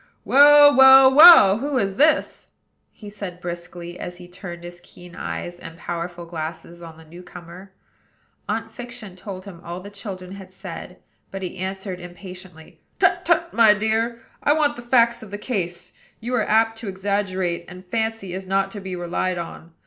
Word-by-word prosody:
"Well, 290 +1 +7
well, 265 0 +8
well! 295 - +9
who 280 +1 -2
is 195 -5 -1
this?" 305 +3 +1 0.4
he 210 - -14
said 200 -4 -8
briskly, 175 0 -8
as 175 0 -7
he 175 0 -12
turned 175 -1 -10
his 175 0 -11
keen 175 0 -15
eyes 175 0 -6
and 165 -1 -11
powerful 175 0 -6
glasses 165 +1 -7
on 165 -1 -11
the 160 - -16
new 170 +3 -13
comer. 180 +2 -13 0.8
Aunt - - -3
Fiction 245 -6 -10
told 185 0 -9
him 180 -4 -11
all 175 +1 -7
the 200 +2 -11
children 195 -3 -8
had 190 -1 -11
said; 185 -1 -9 0.3
but 195 0 -7
he 185 0 -6
answered 190 0 -5
impatiently: 180 -2 -12 0.2
"Tut, - - +2
tut! 340 0 +1
my 220 -3 +5
dear: 225 +2 -2 0.2
I 290 - +3
want 300 -2 +1
the 240 - -9
facts 235 -1 +2
of 220 - -11
the 205 - -6
case. 185 -6 -5 0.3
You 240 +3 -5
are 230 -4 0
apt 225 +1 +2
to 225 - -7
exaggerate; 190 -3 -2
and 185 +1 -12
Fancy 220 -2 -3
is 190 0 -7
not 195 0 0
to 205 - -7
be 190 -1 -6
relied 180 +1 -2
on. 170 -1 -8
190 Hz, 180 wpm, -22 LUFS, 175-225 Hz, 0.8 s, well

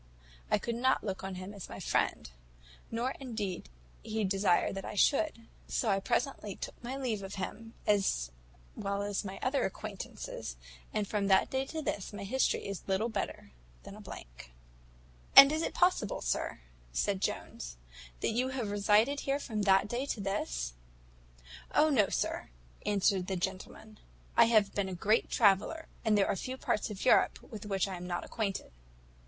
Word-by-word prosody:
I - - +4
could 235 - -3
not 260 +3 +2
look 195 -3 -4
on 190 -1 -4
him 185 +2 -7
as 200 -3 -8
my - - -7
friend, - - 0 0.6
nor 235 +3 -1
indeed 215 - -4 0.3
did - - -11
he 220 0 0
desire 195 -2 +2
that 195 0 -5
I - - -6
should; 275 +1 +2 0.2
so 230 - 0
I 195 - +2
presently 210 -2 -1
took - - -8
my 255 +3 -4
leave 240 -7 -1
of 195 0 -6
him, 225 +4 -6
as 190 - +2 0.4
well 200 0 -2
as 205 -1 -1
of - - -3
my 190 0 -5
other 270 +2 +1
acquaintance; - - -5 0.6
and 210 -2 -1
from 205 -1 0
that 190 -1 +4
day 265 0 0
to 315 +1 -4
this, 205 -7 -3
my 205 -1 -6
history 260 +7 +1
is 200 -2 -4
little 195 +4 +1
better 205 - -4 0.3
than - - -9
a - - -11
blank." - - -10 0.8
"And 275 +1 +12
is 310 +1 0
it - - -2
possible, 355 - +2
sir," - - -1 0.3
said 195 - 0
Jones, - - -3 0.4
"that - - +1
you 245 +3 +1
can 265 0 -4
have 220 -5 -2
resided 210 +7 +3
here 275 0 0
from 220 -7 -3
that 195 0 +4
day 245 +5 -2
to 235 - -2
this?" 60 - -2 1.0
"O 310 +1 +5
no, 210 -8 +4
sir," - - -2 0.4
answered 195 -2 +2
the 190 - -1
gentleman; 190 +4 -5 0.4
"I 235 - +8
have 215 -3 +4
been 200 -2 -1
a 185 - -4
great 215 +6 +2
traveller, 220 - +3 0.2
and 220 -3 +3
there 200 - +4
are - - +1
few 255 +7 -4
parts 210 - -1
of 205 -2 -5
Europe 255 - +5
with 210 -2 -9
which 195 -1 +1
I 190 -2 -4
am 180 0 -7
not 175 -1 -2
acquainted." 200 - -3
205 Hz, 180 wpm, -32 LUFS, 195-235 Hz, 1.0 s, And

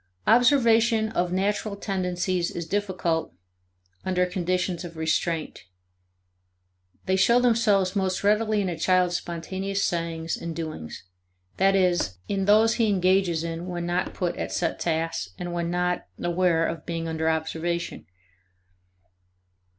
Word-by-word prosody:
1 225 - +6
Observation 235 -3 +3
of 180 -5 -1
natural 200 +2 -1
tendencies 180 -3 -1
is 170 - -5
difficult 180 - -1 0.7
under 180 -1 +1
conditions 180 0 -1
of 170 -2 -9
restraint. 160 - -1 1.4
They 190 - +2
show 235 +6 +4
themselves 215 -6 +2
most 190 -1 0
readily 215 +1 +2
in 195 - -1
a 165 -2 -5
child's 180 0 +2
spontaneous 190 +4 -3
sayings 165 -1 -2
and 170 -1 -6
doings, 155 - -6 0.5
that 195 +1 +4
is, 175 - +1
in 195 -1 -1
those 215 +2 +4
he 220 - +3
engages 185 -3 +2
in 170 +1 -4
when 175 -1 -4
not 175 +1 -1
put 175 -2 -1
at - - -4
set 170 -2 -1
tasks 160 - -2
and 175 -1 -5
when 170 -1 -2
not 180 0 -1
aware 175 -1 +1
of 165 0 -4
being 165 -1 -4
under 160 0 0
observation. 160 - -2
180 Hz, 135 wpm, -25 LUFS, 170-195 Hz, 1.4 s, 1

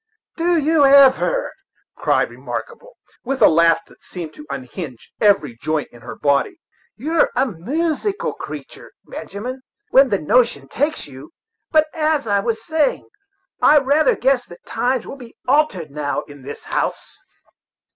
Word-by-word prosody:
"Did 340 -2 +1
you 315 0 +3
ever!" 280 - +5 0.4
cried - - +1
Remarkable, - - -7 0.3
with 270 +2 -2
a - - +7
laugh 165 0 +3
that - - -21
seemed 170 -4 -8
to 300 - -13
unhinge 130 - -7
every 195 - +3
joint 155 -1 -1
in 120 - -16
her - - -8
body. 145 - 0 0.4
"You're 310 +7 +1
a - - +3
moosical 310 - -2
creature, - - -9
Benjamin, 250 +6 -7 0.3
when 270 0 +6
the 200 - +2
notion 235 +8 +2
takes 295 +3 -2
you. 135 +1 -12 0.4
But, 310 -1 +4
as 310 -3 0
I 200 -2 +2
was 225 +1 -3
saying, 315 -3 0 0.5
I 300 - +6
rather 285 +1 +3
guess 265 -1 +2
that 175 - -14
times 250 -1 -1
will 275 - -8
be 245 -3 -13
altered 250 - +1
now 145 0 -2
in 145 -1 -14
this 140 +2 -9
house." - - -3
255 Hz, 145 wpm, -20 LUFS, -, 0.5 s, a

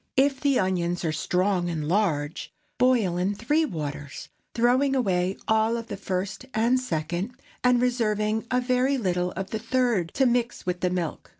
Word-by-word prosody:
If 270 0 +3
the 280 -2 +2
onions 175 -2 0
are 160 - +1
strong 180 +3 0
and 155 -3 -3
large, 160 -5 0 0.3
boil 235 -9 +3
in 190 +3 0
three 295 +9 +1
waters, 145 - -6 0.3
throwing 255 +4 +3
away 190 -6 +1
all 220 +1 +2
of 230 0 -7
the 200 - -3
first 190 +2 -3
and 235 +4 +3
second, 175 - -3 0.2
and 250 -1 +4
reserving 220 -3 0
a 250 - +2
very 255 +2 +1
little 180 -5 0
of 195 0 -5
the 220 - -2
third 230 -7 0
to 270 - +3
mix 245 -1 0
with 180 0 -1
the 180 - +1
milk. 180 -3 -3
210 Hz, 170 wpm, -26 LUFS, 180-250 Hz, 0.3 s, and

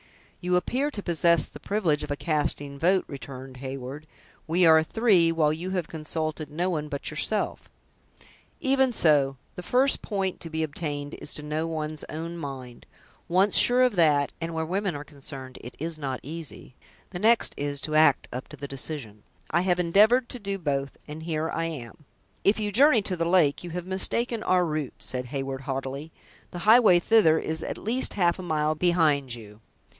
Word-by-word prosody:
"You 180 0 +1
appear 260 +10 0
to 210 -9 -7
possess 170 -2 +3
the - - -12
privilege 180 -8 0
of - - -6
a 145 - -1
casting 145 -2 -2
vote," 185 +4 +2
returned 130 -2 -9
Heyward; 135 +3 -7 0.4
"we 175 +3 +3
are 160 -1 +7
three, 180 -2 +3
while 155 -2 +2
you 170 +4 -5
have 180 -3 -2
consulted 155 -1 -4
no 175 +5 -1
one 150 -3 -3
but 140 0 -4
yourself." 205 +7 -2 0.9
"Even 265 -1 +2
so. 145 - +3 0.2
The - - -7
first 255 +9 +2
point 195 -3 -2
to 165 - -8
be 160 0 -2
obtained 145 -2 -4
is - - -3
to 150 - -6
know 155 +2 -2
one's 155 -1 -4
own 165 +2 -5
mind. 130 -6 -8 0.4
Once 190 +3 +3
sure 250 +1 +7
of 250 -4 +2
that, 150 -4 +3
and 165 0 -4
where 160 0 -1
women 190 +1 -2
are 145 - -6
concerned 135 -3 -8
it 120 - -10
is 160 +1 -4
not 135 -3 -3
easy, 155 -3 -7 0.4
the 175 - -5
next 225 +3 +3
is, 145 0 -3
to 155 - -5
act 155 -3 +4
up 125 +1 -6
to - - -12
the 140 - -6
decision. 135 -6 -5 0.3
I 170 - +2
have 180 -1 +1
endeavored 215 +8 +4
to 250 - -7
do 200 -2 -3
both, 140 -5 -3
and 155 +1 -8
here 160 -1 -2
I 165 - -2
am." 150 -2 -8 0.4
"If 205 +3 +3
you 210 -1 -2
journey 250 0 +5
to 190 - 0
the 165 -1 -1
lake, 170 -5 +3
you 175 - -6
have 175 +1 -5
mistaken 225 +5 +1
your 180 -1 +3
route," 155 -4 -3
said 125 -1 -4
Heyward, 135 0 -4
haughtily; 135 +3 -5 0.4
"the - - -8
highway 220 -4 +7
thither 175 -3 +4
is 160 0 -3
at - - -4
least 245 +5 +1
half 175 -2 +2
a - - -4
mile 155 -3 0
behind 155 -6 +1
you." 105 -2 -13
160 Hz, 190 wpm, -26 LUFS, 145-185 Hz, 0.9 s, are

